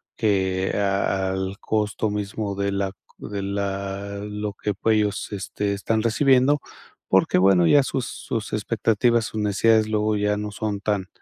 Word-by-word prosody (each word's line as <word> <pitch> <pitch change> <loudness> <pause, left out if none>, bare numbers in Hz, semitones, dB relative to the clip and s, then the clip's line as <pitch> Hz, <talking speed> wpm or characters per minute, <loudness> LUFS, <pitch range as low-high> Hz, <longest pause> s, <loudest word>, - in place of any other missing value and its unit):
que 95 -3 +1
a 95 -1 0
al 95 +1 -3
costo 105 0 -1
mismo 105 0 -3
de 100 0 -1
la 100 -1 -1 0.3
de 100 -1 -5
la 100 0 -3
lo 105 0 -4
que 105 +1 -3 0.2
ellos, 105 -2 +1
este, 100 0 -2
están 110 +2 0
recibiendo. 130 +4 +3 0.5
Porque, - - +3
bueno, 90 -2 +5
ya 145 - +6
sus 130 -2 -2
sus 115 -2 -5
expectativas, 115 +1 +1
sus 110 - -5
necesidades, 110 +2 +3
luego 105 0 +1
ya 105 0 +1
no 105 0 -4
son 105 0 -3
tan 105 -3 -1
105 Hz, 150 wpm, -23 LUFS, 100-110 Hz, 0.5 s, ya